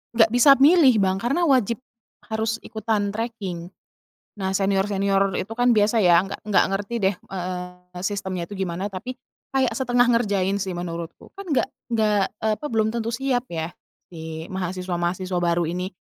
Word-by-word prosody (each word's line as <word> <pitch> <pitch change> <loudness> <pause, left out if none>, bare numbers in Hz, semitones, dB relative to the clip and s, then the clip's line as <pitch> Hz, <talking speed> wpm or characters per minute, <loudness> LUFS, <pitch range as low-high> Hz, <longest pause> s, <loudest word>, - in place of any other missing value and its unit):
Nggak 225 -1 +5
bisa 245 +3 +6
milih, 290 -2 +7
Bang, 190 0 +1
karena 275 - 0
wajib 250 - +2 0.5
harus 220 +1 -1
ikutan 215 -2 -1
treking. 205 -6 -4 0.7
Nah, 190 -2 -3
senior-senior 195 0 +1
itu, 210 +4 -4
kan, 245 +1 +3
biasa, 215 0 +3
ya, 175 -2 +6
nggak 200 - -7
nggak 210 -2 +3
ngerti 205 +4 -3
deh, 195 -2 +1
eee, 180 -1 -7
sistemnya 190 -2 -3
itu 205 - -7
gimana, 190 +1 -3
tapi 195 +7 -6 0.4
kayak 265 -2 +3
setengah 245 +1 +2
ngerjain, 200 -5 +1
sih, 190 -2 -3
menurutku, 170 -1 -6
kan 395 - -7
nggak 290 -7 +1 0.3
nggak 210 -2 +2 0.2
eee, 220 -1 +2
apa, 300 - -5
belum 220 -5 +1
tentu 230 0 -3
siap, 255 -1 -1
ya, 165 -3 -4 0.4
si 160 -1 -7
mahasiswa-mahasiswa 180 0 -2
baru 175 0 +1
ini. 180 +2 -3
200 Hz, 155 wpm, -23 LUFS, 180-230 Hz, 0.7 s, milih